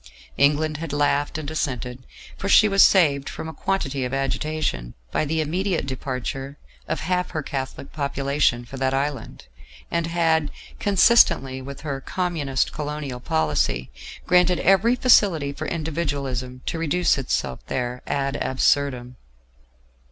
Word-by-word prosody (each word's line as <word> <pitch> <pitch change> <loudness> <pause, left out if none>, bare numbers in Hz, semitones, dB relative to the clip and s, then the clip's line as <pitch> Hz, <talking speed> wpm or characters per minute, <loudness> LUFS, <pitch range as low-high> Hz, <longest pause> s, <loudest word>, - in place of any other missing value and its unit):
England 150 +1 +2
had 165 -1 -5
laughed 145 +1 +1
and 155 -1 -5
assented, 125 -4 -4 0.3
for 195 - -4
she 215 - +7
was 195 -1 +4
saved 145 -7 +4
from - - -6
a 160 - -6
quantity 140 -6 -2
of 125 +2 -2
agitation 135 - -2 0.2
by - - 0
the 160 +2 0
immediate 175 +2 -1
departure 135 +1 -5 0.3
of - - -2
half 180 0 -1
her 155 -3 -4
Catholic 135 -1 -5
population 140 -3 0
for 135 - -9
that 135 0 0
island, 135 - -3 0.5
and 170 -1 0
had, 165 -3 +1 0.3
consistently 190 - +4
with 140 +1 -9
her 140 -3 -4
Communist 155 -6 -1
colonial 150 -4 -4
policy, 75 - 0 0.3
granted 180 0 +4
every 195 +7 +4
facility 190 - +4
for - - -5
Individualism 140 -6 -3
to 165 - -3
reduce 165 -1 +2
itself 95 - -2
there 125 0 -3
ad 140 0 -1
absurdum. 130 -2 0
145 Hz, 135 wpm, -23 LUFS, 130-165 Hz, 0.5 s, she